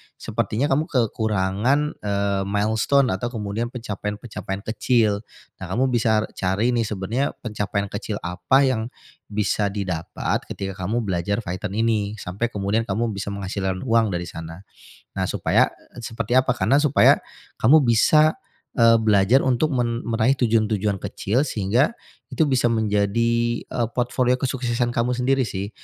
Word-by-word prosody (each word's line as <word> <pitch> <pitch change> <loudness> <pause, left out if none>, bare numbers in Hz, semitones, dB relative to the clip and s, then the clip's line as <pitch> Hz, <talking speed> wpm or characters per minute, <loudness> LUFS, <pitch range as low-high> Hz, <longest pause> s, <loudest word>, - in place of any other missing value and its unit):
sepertinya 135 +7 -2
kamu 150 +4 +1
kekurangan, 110 0 +1 0.2
eee, 100 -1 -1
milestone 110 +6 +2
atau 95 +6 -2
kemudian 105 +2 -3
pencapaian-pencapaian 105 -3 -5
kecil. 110 -5 +2 0.4
Nah, 95 - -5
kamu 130 +6 +1
bisa 110 -3 +2 0.2
cari, 95 +6 +1
nih, 115 -2 0
sebenarnya 110 +7 -2
pencapaian 105 -3 -2
kecil 105 +1 -4
apa 90 +10 +2
yang 120 -4 0 0.4
bisa 105 0 0
didapat 95 -5 -2
ketika 95 -2 -5
kamu 115 +3 0
belajar 100 +3 -1
Python 95 +2 -5
ini, 110 -2 0
sampai 95 +7 -3
kemudian 105 +1 -1
kamu 110 +4 -1
bisa 100 -1 -5
menghasilkan 95 -1 -3
uang 115 -2 +3
dari 85 - -2
sana. 80 +2 -9 0.5
Nah, - - 0
supaya, - - +2 0.3
eee, 120 - -8
seperti 115 +2 -2
apa, 130 -1 +4
karena 130 +5 +2
supaya 145 -2 +5 0.4
kamu 145 +7 +6
bisa, 150 +7 +4 0.4
eee, 115 -1 +6
belajar 110 +3 +4
untuk 130 +4 +2
men 120 -1 -1
meraih 115 +3 +2
tujuan-tujuan 110 -5 +1
kecil, 115 +7 -1
sehingga 120 - +1 0.4
itu - - 0
bisa 130 -3 +2
menjadi, 115 +2 +1
eee, 120 - -2
portfolio 125 0 +1
kesuksesan 125 -2 -1
kamu 120 +1 0
sendiri, 130 +1 +1
sih. 100 0 -4
110 Hz, 140 wpm, -23 LUFS, 100-120 Hz, 0.5 s, kamu